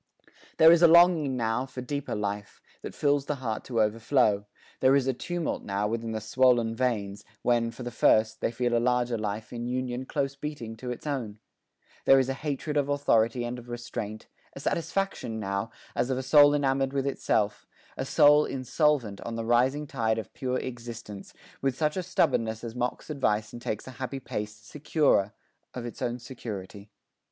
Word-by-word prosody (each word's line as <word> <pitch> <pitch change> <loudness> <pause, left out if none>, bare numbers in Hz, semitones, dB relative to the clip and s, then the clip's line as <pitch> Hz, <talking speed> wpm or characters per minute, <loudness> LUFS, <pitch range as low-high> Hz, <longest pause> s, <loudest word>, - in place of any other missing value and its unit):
There 160 +1 +8
is 170 0 +5
a 170 - +9
longing 165 -5 +5
now 115 +2 -1
for 125 -1 -7
deeper 140 0 -3
life 100 0 -4 0.2
That - - -7
fills 145 -1 +1
the 150 - -1
heart 115 -5 -4
to 120 -3 -2
overflow 105 -1 +1 0.3
there 130 +1 +5
is 140 -2 +2
A 135 - +1
tumult 175 +6 -3
now 100 +1 -1
within 115 +1 -3
the 110 - -2
swollen 120 0 +2
veins, 105 -5 -1 0.2
When, 120 -1 +2
for 125 - -9
the 120 - -5
first, 110 -1 +3
they - - +1
feel 120 0 0
a - - +4
larger 125 0 +1
life 110 0 -4
In 120 0 -4
unison 125 0 -3
close 140 0 -2
beating 140 -6 -6
to 125 +2 -6
its 125 - -6
own 125 -8 -3 0.7
There 135 - +7
is 135 -1 +2
a - - 0
hatred 150 +1 -3
of 145 -1 +1
authority 120 -4 +2
And 120 +1 -4
of 120 0 -13
restraint 120 -3 -6 0.3
a - - -9
satisfaction 170 - -2
now 100 +1 -2 0.3
As 120 +2 0
of 130 - 0
a 130 - -3
soul 145 +2 +6
enamoured 135 -1 +1
with 135 -1 0
itself, 110 -6 0 0.3
A - - -3
soul 150 +1 +5
insolvent 130 -4 0
on 115 - -5
the 115 0 -3
rising 130 +5 +2
tide 110 -5 -1
Of 110 - -6
pure 130 -1 -2
existence, 120 -5 -7 0.3
with 135 -1 0
such 150 -1 0
a 185 - -1
stubborness 115 -10 0
As 115 -1 -5
mocks 125 +5 -3
advice 105 -7 0
and 120 - -8
takes 105 - -4
a 130 - -8
happy 135 +1 -3
pace, 105 -4 -5
Securer 115 -2 +1 0.4
of 125 -2 -5
its 120 - -8
own 120 0 -1
security. 105 -5 -8
125 Hz, 185 wpm, -28 LUFS, 110-135 Hz, 0.7 s, a